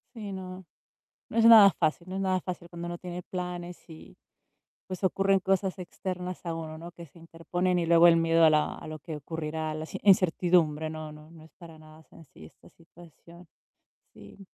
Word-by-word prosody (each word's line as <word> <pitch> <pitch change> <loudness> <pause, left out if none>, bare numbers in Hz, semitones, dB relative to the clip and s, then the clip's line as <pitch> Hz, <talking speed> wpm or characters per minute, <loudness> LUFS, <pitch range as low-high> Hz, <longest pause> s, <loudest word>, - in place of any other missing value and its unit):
Sí, 210 -3 -7
no, 185 -1 -8 0.7
no - - -2
es 230 - +5
nada 220 -4 +9
fácil 170 0 -2
no 190 - -5
es - - -2
nada 185 -1 0
fácil 175 -2 -7
cuando 170 0 -8
uno 175 0 -6
tiene 180 0 -7
planes 180 -1 -6
y 160 -1 -14 0.7
pues 185 0 -7
ocurren 195 +1 +2
cosas 190 0 -1
externas 180 0 -6
a 165 - -2
uno, 160 -1 -7
¿no? 170 +2 -10
Que 170 0 -12
se 165 - -20
interponen 175 +2 -2
y 170 - -1
luego 170 +1 +6
el 165 - +6
miedo 165 0 +3
a 160 - +7
la 155 0 +1
a - - -11
lo 155 0 -7
que 160 0 -7
ocurrirá, 155 +1 -5
la 155 - -5
inci - - -7
incertidumbre. 175 -5 +3
No 155 -1 -7
no 150 +1 -15
no 165 -1 -15
es 160 - -19
para 165 -3 -13
nada 155 0 -16
sencilla 135 - -16
esta - - -21
situación. 170 +1 -18 0.7
Sí. - - -15
170 Hz, 200 wpm, -28 LUFS, 160-185 Hz, 0.7 s, nada